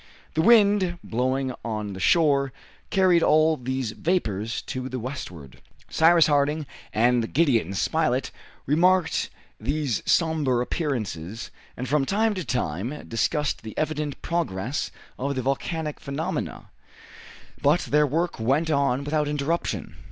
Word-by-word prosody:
The 160 - +2
wind, 200 -4 +5
blowing 130 +2 -1
on 105 -3 -3
the 95 - -7
shore, 140 - +3 0.4
carried 185 -3 +4
all 155 +1 +4
these 130 -3 -3
vapors 115 - -1
to 130 0 -5
the 130 - -4
westward. 90 - -7 0.3
Cyrus 165 0 +5
Harding 150 +1 +1 0.3
and 120 +1 +2
Gideon 120 - +2
Spilett 135 - 0 0.3
remarked 175 +4 +2 0.3
these 140 -1 -1
somber 155 -7 +2
appearances, 115 - -3 0.3
and 125 - -4
from 145 +1 +2
time 220 +2 +2
to 185 -3 -4
time 120 - -3
discussed 145 +5 0
the 110 -1 -9
evident 150 -2 -2
progress 145 - -2 0.3
of 140 +2 -1
the 130 - -2
volcanic 150 +3 -2
phenomena, 160 +7 -4 0.9
but 150 +5 +3
their 150 0 +2
work 165 +3 -1
went 140 +8 +1
on 140 -2 +1
without 150 +1 0
interruption. 150 +3 -2
140 Hz, 125 wpm, -25 LUFS, 125-160 Hz, 0.9 s, wind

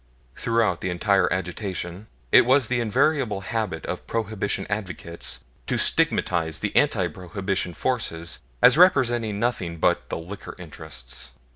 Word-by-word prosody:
Throughout 115 -6 +1
the 90 - -2
entire 95 +2 +2
agitation, 90 +1 -4 0.2
it - - +8
was 130 -1 +4
the 125 -1 +1
invariable 120 -2 +1
habit 105 -5 -3
of - - -5
Prohibition 105 -3 -2
advocates 85 - -4 0.2
to - - 0
stigmatize 80 -3 +2
the 105 - -3
anti 110 -11 +3
Prohibition 95 +1 -3
forces 85 -10 -1 0.2
as 130 +5 +7
representing 120 - +4
nothing 100 -8 -1
but - - +1
the - - -2
"liquor 90 +5 -8
interests." 75 -8 -6
100 Hz, 130 wpm, -24 LUFS, 85-115 Hz, 0.2 s, it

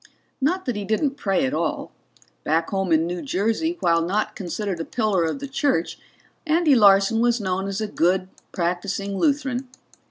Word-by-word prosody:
Not 360 +8 0
that 250 -4 -2
he 205 - -3
didn't 220 +7 0
pray 195 - 0
at 130 - -2
all; 155 0 -2 0.5
back 165 +2 0
home 195 -2 -1
in 160 0 +4
New 175 +1 -4
Jersey, 265 - -1
while 165 -1 +3
not 195 +6 -1
considered 190 0 -4
a - - -2
pillar 210 -5 0
of 160 - -2
the 280 0 -6
church, 270 - -1 0.5
Andy 315 -1 +4
Larson 200 -1 +5
was 240 0 +2
known 190 -1 -2
as 200 +2 -3
a 215 - -1
good, 185 -1 +1 0.2
practicing 190 +3 -2
Lutheran. 275 -2 0
200 Hz, 170 wpm, -23 LUFS, 180-250 Hz, 0.5 s, Larson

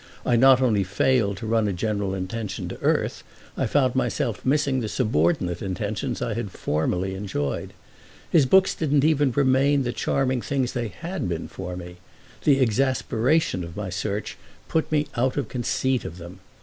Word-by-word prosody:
I 120 - +3
not 130 +2 +6
only 110 -6 +3
failed 100 +2 +1
to 115 - -6
run 110 -1 +2
a 100 - -1
general 100 0 -1
intention 95 +1 -4
to - - -8
earth, - - 0 0.3
I - - 0
found 130 -4 +2
myself 125 -3 -1
missing 140 -1 +2
the 110 -3 -3
subordinate 90 - +1
intentions 100 +4 -3
I 115 -2 -1
had 115 -2 -3
formerly 90 +3 -1
enjoyed. 90 -9 -3 0.6
His 150 -6 +4
books 190 +5 +5
didn't 145 -3 +1
even 145 -3 +3
remain 135 +2 +3
the 120 -1 -2
charming 130 -2 0
things 130 -2 -1
they 120 -2 -2
had 170 - -5
been 85 -2 -3
for 90 -1 -6
me; 90 0 -9 0.5
the 140 -2 +5
exasperation 130 - +1
of 85 +2 -9
my 100 -3 -4
search 100 +3 -3 0.3
put 160 -1 -1
me 150 -1 +2
out 130 +2 0
of 135 -6 -2
conceit 130 0 0
of 85 - -7
them. 90 +2 -10
115 Hz, 170 wpm, -24 LUFS, 95-135 Hz, 0.6 s, not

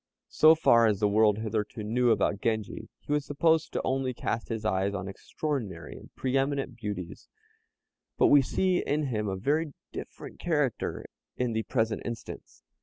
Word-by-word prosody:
So 155 +1 +7
far 115 -7 +5
as 105 -3 +1
the 105 - +3
world 105 0 +4
hitherto 110 0 -3
knew 120 +3 +1
about 100 -3 +1
Genji, 110 -3 -2
he - - -8
was 150 -1 +2
supposed 160 +3 +1
only 130 -1 -1
to - - -23
cast 115 - -2
his 110 -2 -4
eyes 100 -1 0
on 95 -1 -4
extraordinary 105 - -5
and - - -12
pre 130 0 -2
eminent 135 -1 0
beauties; 100 -6 -6 0.9
but - - +4
we 145 - +7
see 185 +7 +1
in 150 +1 0
him 110 -6 -2
a 95 - -2
very 145 +9 0 0.2
different - - -9
character 150 -8 -1 0.3
in 125 -2 0
the 110 - 0
present 110 -2 -1
instance. 120 -1 -8
115 Hz, 170 wpm, -28 LUFS, 105-140 Hz, 0.9 s, So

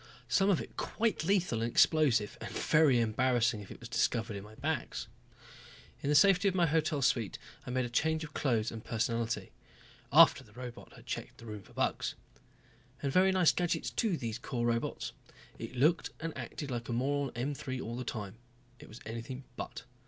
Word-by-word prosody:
Some 195 0 +3
of 190 - +3
it - - -8
quite 225 -1 -1
lethal 180 - +2
and 115 - 0
explosive, 130 -7 +4
and - - -5
very 150 -5 +4
embarrassing 120 0 +2
if 100 - -11
it - - -10
was 120 - -8
discovered 115 -2 0
in 100 - -6
my 105 +1 -13
bags. - - -2 1.0
In 140 - -1
the 150 - +3
safety 195 +5 +6
of 190 - +1
my 175 -2 +4
hotel 155 -2 +1
suite 115 -5 +1 0.3
I - - -3
made 130 0 0
a - - -4
change 160 +5 +1
of 155 -1 -8
clothes 115 -6 +1
and 115 -1 -7
personality. 115 -3 -1 0.6
After - - +7
the 105 - -20
robot 125 0 -9
had - - -15
checked - - -5
the 115 - -12
rooms 105 -3 -8
for - - -18
bugs. - - -1 0.9
And 135 -1 0
very 190 +1 +5
nice 185 -3 +5
gadgets 175 -1 -1
too, 210 -8 0
these 115 -3 -4
Corps 120 -1 -2
robots. 115 0 -1 0.5
It - - -6
looked 155 +7 +3
and 165 0 -4
acted 145 -3 -6
like 120 0 -4
a - - -1
moron 140 +3 0
M 130 +5 -1
3 130 -2 -5
all 115 -1 -4
the 125 - -4
time. 105 -3 -5 0.4
It - - -12
was 110 - -11
anything 115 +4 -6
but. - - -6
125 Hz, 195 wpm, -32 LUFS, 115-155 Hz, 1.0 s, After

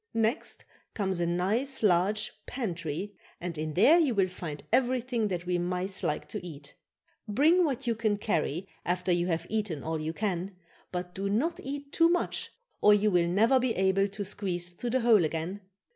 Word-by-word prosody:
Next 225 +5 -1 0.3
comes 190 -4 0
a 170 - +1
nice, 215 +11 0
large 200 +2 +2 0.2
pantry 185 - -4 0.3
and 175 -1 -4
in 155 0 -4
there 285 - +6
you 285 -8 +2
will 190 -2 +2
find 165 -5 -7
everything 250 -2 +1
that 180 -3 -3
we 180 0 0
mice 180 +3 -2
like 150 -4 -2
to - - -5
eat. 145 -5 -9 0.5
Bring 315 - +4
what 275 -3 -2
you 235 - +2
can 215 -2 0
carry, 175 -3 -1 0.2
after 180 +1 0
you 175 0 +2
have 165 -1 -1
eaten 205 -10 -2
all 160 -1 -2
you 155 +1 -2
can, 190 0 -3 0.4
but 180 0 -4
do 195 +2 -3
not 275 +12 0
eat 280 +1 -6
too 330 0 +5
much 350 0 0 0.3
or 210 0 +7
you 210 +1 +2
will 175 -2 +3
never 225 +9 +4
be 250 -2 0
able 190 +1 +2
to 205 0 -5
squeeze 180 -3 -2
through 240 +7 -5
the 260 +2 +1
hole 225 -5 +5
again. 165 +5 -3
195 Hz, 185 wpm, -29 LUFS, 175-230 Hz, 0.5 s, or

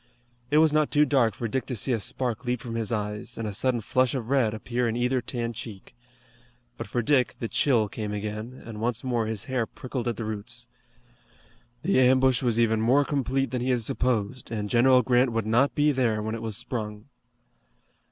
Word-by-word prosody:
It 150 - +3
was 155 -1 +5
not 155 -1 +3
too 150 0 +4
dark 125 -8 +2
for 115 - -3
Dick 130 +4 -2
to 125 - -3
see 125 +4 -2
a 115 - 0
spark 120 +4 -3
leap 125 -1 -1
from 115 -1 -7
his 115 -1 -2
eyes, 105 -1 -3
and 115 - -3
a 105 - -4
sudden 120 +3 0
flush 130 +4 +1
of 120 -3 -4
red 130 -6 +3
appear 120 +3 -2
in 115 - -2
either 125 +1 +1
tanned 120 -2 -3
cheek. 105 -3 -9 0.8
But 115 - -6
for 120 +3 -1
Dick 130 0 +2
the 115 - -2
chill 115 -3 +2
came 105 0 -5
again, 105 +4 -5
and 110 -2 -7
once 120 0 -1
more 120 -4 0
his 110 -3 -3
hair 125 -4 -1
prickled 130 -1 -5
at 120 -2 -1
the 115 - -4
roots. 110 +3 -5 1.2
The 170 -5 +3
ambush 130 0 +4
was 120 -3 +1
even 110 -1 +2
more 130 +6 +4
complete 135 -2 -1
than 125 -1 -2
he 125 - -1
had 125 -2 +1
supposed, 120 0 -1
and 105 -2 -4
General 125 +1 +5
Grant 125 +1 +3
would 115 -2 -1
not 120 +6 +2
be 150 0 +3
there 115 -6 0
when 110 +1 -3
it 115 - -4
was 110 -3 -1
sprung. 105 -3 -4
120 Hz, 210 wpm, -26 LUFS, 110-130 Hz, 1.2 s, was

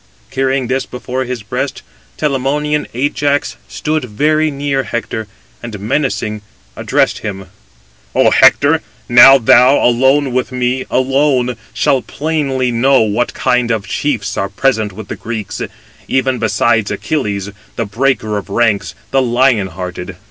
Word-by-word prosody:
Carrying 135 0 0
this 130 +2 -2
before 130 +1 -4
his 125 -3 -5
breast, 105 - -4 0.3
Telamonian 150 +1 -1
Ajax 145 +2 0
stood 150 - -2
very 155 +7 +1
near 140 -1 -1
Hector, 115 -3 -4 0.3
and 115 -4 -7
menacing 110 -2 -2 0.3
addressed - - 0
him: 95 -3 -6 0.7
"Ο - - +4
Hector, - - +5 0.3
now 125 +3 +8
thou, 125 +2 +5
alone 130 +3 +3
with 130 +1 -1
me 125 +1 -1
alone, 130 -1 +1 0.2
shalt 130 -2 0
plainly 140 -5 -1
know, 130 +3 +3
what 110 +2 0
kind 125 -1 +1
of 110 -3 -1
chiefs 115 -5 -2
are 100 - -1
present 110 -1 0
with 105 +2 -9
the - - -5
Greeks, 110 -4 -5 0.5
even 130 -1 0
besides 115 -5 +1
Achilles, 100 -9 -2 0.2
the 115 - -2
breaker 110 -1 0
of 100 - -12
ranks, 105 -1 0 0.2
the 135 - +3
lion 120 -4 +2
hearted. 90 0 -7
125 Hz, 135 wpm, -15 LUFS, 110-135 Hz, 0.7 s, now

